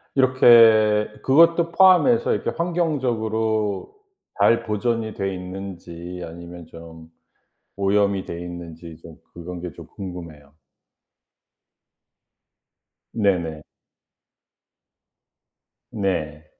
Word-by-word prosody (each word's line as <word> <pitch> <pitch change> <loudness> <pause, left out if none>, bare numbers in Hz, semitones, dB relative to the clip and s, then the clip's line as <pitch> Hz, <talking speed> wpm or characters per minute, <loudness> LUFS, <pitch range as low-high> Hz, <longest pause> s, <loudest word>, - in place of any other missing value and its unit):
이렇게 115 -5 +5
그것도 165 +4 +4
포함해서 190 +7 +4
이렇게 - - -3
환경적으로 110 - -2 0.4
잘 115 - +3
보존이 110 +1 -2
돼 95 0 -3
있는지 90 -1 -8
아니면 85 0 -11
좀 80 -1 -13 0.7
오염이 100 0 +1
돼 85 - -7
있는지 85 -2 -9
좀 80 -2 -13 0.2
그런 85 +1 -8
게 90 -1 -7
좀 - - -13
궁금해요. 85 -7 -9 2.6
네네. 85 -8 -1 2.3
네. 80 -7 -3
100 Hz, 175 characters per minute, -22 LUFS, 85-115 Hz, 2.6 s, 이렇게